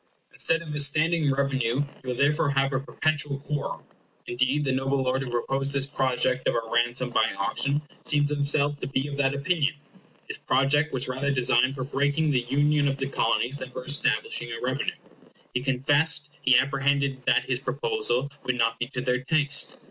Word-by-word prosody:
Instead 165 Hz, 0 st, +1 dB
of 155 Hz, -2 st, -7 dB
a 150 Hz, -, -2 dB
standing 155 Hz, +1 st, +3 dB
revenue, 135 Hz, -4 st, 0 dB
you -, -, -6 dB, 0.2 s
will 125 Hz, -, -1 dB
therefore 145 Hz, +3 st, +2 dB
have 135 Hz, 0 st, +1 dB
a 130 Hz, -, +1 dB
perpetual 145 Hz, 0 st, -2 dB
quarrel. 145 Hz, +1 st, -5 dB, 0.4 s
Indeed, 130 Hz, +4 st, 0 dB
the 135 Hz, -, 0 dB
noble 135 Hz, +1 st, 0 dB
lord 130 Hz, +1 st, 0 dB
who 135 Hz, -, -5 dB
proposed 135 Hz, +3 st, -2 dB
this 135 Hz, -1 st, +2 dB
project 130 Hz, -2 st, 0 dB
of -, -, +1 dB
a 115 Hz, -1 st, -2 dB
ransom 120 Hz, +1 st, 0 dB
by -, -, +2 dB
auction 140 Hz, +2 st, 0 dB, 0.2 s
seems 145 Hz, -1 st, +2 dB
himself 145 Hz, 0 st, +1 dB
to -, -, -4 dB
be 135 Hz, +1 st, -1 dB
of 140 Hz, -, -6 dB
that 140 Hz, -1 st, +1 dB
opinion. 150 Hz, +1 st, 0 dB, 0.5 s
His -, -, -6 dB
project 145 Hz, +4 st, +2 dB
was 130 Hz, 0 st, -1 dB
rather 130 Hz, +2 st, -2 dB
designed 130 Hz, -1 st, +2 dB
for 130 Hz, -, -4 dB
breaking 145 Hz, +3 st, 0 dB
the 125 Hz, -3 st, 0 dB
union 145 Hz, +1 st, +2 dB
of 135 Hz, 0 st, -1 dB
the 135 Hz, -, -1 dB
Colonies 120 Hz, +2 st, 0 dB
than 130 Hz, -2 st, -7 dB
for 125 Hz, -, -7 dB
establishing 120 Hz, -3 st, +1 dB
a 115 Hz, -, -5 dB
revenue. 130 Hz, +3 st, -2 dB, 0.6 s
He 125 Hz, -, -1 dB
confessed 145 Hz, +3 st, +2 dB
he 130 Hz, -1 st, +5 dB
apprehended 140 Hz, 0 st, +1 dB
that -, -, +3 dB
his -, -, -1 dB
proposal 435 Hz, -, -1 dB
would 125 Hz, -1 st, -2 dB
not 115 Hz, -1 st, +1 dB
be 120 Hz, -, -2 dB
to 125 Hz, -1 st, -5 dB
their 125 Hz, -1 st, 0 dB
taste. 145 Hz, 0 st, 0 dB
140 Hz, 185 wpm, -26 LUFS, 130-145 Hz, 0.6 s, he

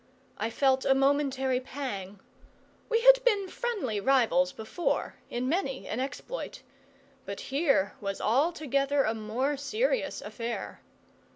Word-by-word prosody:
I 220 Hz, +2 st, -1 dB
felt 265 Hz, +3 st, +2 dB
a 270 Hz, -, +4 dB
momentary 270 Hz, -2 st, +2 dB
pang. 210 Hz, -8 st, -6 dB, 0.7 s
We 460 Hz, -1 st, +2 dB
had -, -, +7 dB
been 415 Hz, -6 st, +2 dB
friendly 380 Hz, -, -2 dB
rivals 210 Hz, -8 st, +3 dB
before, 220 Hz, +11 st, -2 dB
in 245 Hz, +1 st, -2 dB
many 275 Hz, -4 st, -1 dB
an 225 Hz, -, -3 dB
exploit; 280 Hz, -, -5 dB, 0.6 s
but 200 Hz, 0 st, -5 dB
here 275 Hz, -, +2 dB
was 195 Hz, -1 st, -3 dB
altogether 275 Hz, +1 st, +1 dB
a 220 Hz, -, +1 dB
more 235 Hz, +6 st, -1 dB
serious 455 Hz, -, 0 dB
affair. 235 Hz, 0 st, -5 dB
270 Hz, 120 wpm, -29 LUFS, 225-310 Hz, 0.7 s, had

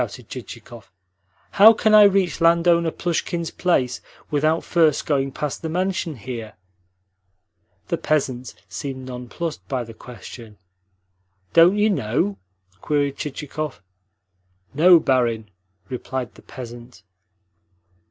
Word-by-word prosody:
shouted 120 Hz, 0 st, -6 dB
Chichikov. 120 Hz, -3 st, -10 dB, 0.6 s
"How 220 Hz, +3 st, +8 dB
can 215 Hz, 0 st, +1 dB
I 210 Hz, -1 st, +9 dB
reach 195 Hz, -4 st, +2 dB
landowner 170 Hz, 0 st, +4 dB
Plushkin's 170 Hz, 0 st, -2 dB
place 130 Hz, -9 st, 0 dB, 0.3 s
without 155 Hz, +2 st, +1 dB
first 160 Hz, -4 st, +2 dB
going 135 Hz, -2 st, 0 dB
past 150 Hz, +1 st, -4 dB
the 160 Hz, -, -4 dB
mansion 180 Hz, -2 st, -1 dB
here?" 115 Hz, -2 st, -7 dB, 1.4 s
The -, -, -1 dB
peasant 130 Hz, -4 st, -1 dB
seemed 130 Hz, -2 st, -6 dB
nonplussed 130 Hz, +6 st, -6 dB
by 130 Hz, -3 st, -2 dB
the 115 Hz, -1 st, -11 dB
question. 115 Hz, -2 st, -11 dB, 1.0 s
"Don't 170 Hz, +4 st, +6 dB
you 210 Hz, +1 st, +3 dB
know?" 175 Hz, -, -1 dB, 0.4 s
queried 145 Hz, -2 st, 0 dB
Chichikov. 150 Hz, -2 st, -5 dB, 0.9 s
"No, 170 Hz, +4 st, +7 dB
barin," 115 Hz, -7 st, 0 dB, 0.4 s
replied 125 Hz, 0 st, -5 dB
the -, -, -17 dB
peasant. 120 Hz, -2 st, -11 dB
145 Hz, 110 wpm, -22 LUFS, 125-170 Hz, 1.4 s, I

